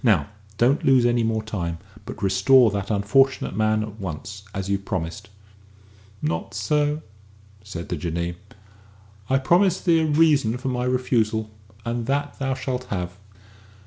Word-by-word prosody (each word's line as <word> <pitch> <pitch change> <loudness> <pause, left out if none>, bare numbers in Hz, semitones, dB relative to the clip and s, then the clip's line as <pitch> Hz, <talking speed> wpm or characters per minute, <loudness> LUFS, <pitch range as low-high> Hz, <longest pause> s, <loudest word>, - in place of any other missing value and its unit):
Now, 100 - +3 0.3
don't 130 +5 +3
lose 130 -3 +5
any 120 0 +3
more 110 -1 0
time, 85 -6 -3 0.3
but - - -7
restore 100 +5 +5
that 100 0 -3
unfortunate 110 +5 +2
man 110 0 +2
at 110 0 -8
once, 95 +2 -6
as 95 -1 -4
you've 100 0 -1
promised." 85 -2 -4 0.9
"Not 80 +5 -2
so," 150 +8 0 0.6
said 90 -4 -7
the - - -1
Jinnee; 85 +2 -3 1.0
"I 135 - +4
promised 180 +7 +2
thee 170 -2 +5
a 160 - +2
reason 145 -6 +3
for 130 +1 -3
my 125 -1 -1
refusal 115 -4 0 0.3
and 120 0 -2
that 145 +1 -1
thou 135 -1 -1
shalt 125 -1 -3
have. 90 -2 -4
110 Hz, 145 wpm, -24 LUFS, 100-135 Hz, 1.0 s, lose